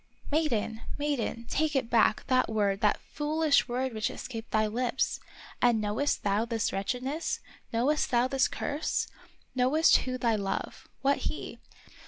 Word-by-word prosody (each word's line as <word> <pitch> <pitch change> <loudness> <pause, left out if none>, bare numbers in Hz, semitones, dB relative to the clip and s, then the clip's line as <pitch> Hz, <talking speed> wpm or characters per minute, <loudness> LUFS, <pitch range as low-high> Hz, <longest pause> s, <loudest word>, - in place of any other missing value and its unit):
" - - -15
Maiden! 235 -8 0 0.2
maiden! 280 -5 -2
take 305 0 0
it 265 -3 +1
back, 225 -2 +3
that 255 -1 +2
word, 205 -2 +1
that 210 - +3
foolish 305 0 +2
word 255 +1 -1
which 215 -1 -1
escaped 230 -3 -7
thy 215 0 +2
lips. 240 +4 0 0.4
And 240 -2 +4
knowest 215 +7 0
thou 205 +2 +2
this 230 -2 -1
wretchedness? 255 +10 -2 0.3
Knowest 265 +7 +1
thou 245 0 +3
this 270 0 +2
curse 295 +2 -2 0.5
Knowest 265 +6 +5
who 255 0 -3
thy 235 -3 +2
love, 200 -2 -4
— - - -41
what 280 +1 +3
he. - - -7
250 Hz, 155 wpm, -29 LUFS, 220-280 Hz, 0.5 s, Knowest